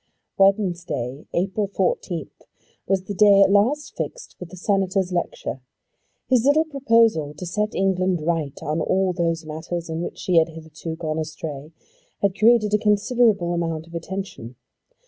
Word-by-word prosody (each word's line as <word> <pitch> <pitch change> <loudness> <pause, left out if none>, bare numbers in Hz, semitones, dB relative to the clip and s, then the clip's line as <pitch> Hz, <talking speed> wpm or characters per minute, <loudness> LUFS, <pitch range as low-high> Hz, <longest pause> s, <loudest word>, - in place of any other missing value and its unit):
Wednesday, 175 - 0
April 195 +3 -1
14th, 180 -4 -3 0.4
was 190 -1 +1
the 200 - -5
day 200 0 +6
at 195 - +3
last 245 +10 +2
fixed - - -6
for 180 - -6
the 185 +2 -12
Senator's 190 -1 0
lecture. 175 -6 -3 0.7
His 250 -3 +3
little 295 +4 +4
proposal 230 - +2
to 180 - -6
set 210 +4 -2
England 185 -2 +1
right 160 -4 -1
on 155 +2 -1
all 190 -1 +1
those 165 -2 -1
matters 165 +2 -5
in 160 +1 -3
which - - -5
she 180 -2 0
had 165 0 +4
hitherto 160 0 -8
gone 160 -1 -3
astray 155 -1 -6 0.5
had 195 -2 +2
created 215 -1 +4
a 210 - +4
considerable 210 -3 +2
amount 165 -2 -2
of 170 - -17
attention. 170 -8 -6
185 Hz, 150 wpm, -23 LUFS, 165-205 Hz, 0.7 s, day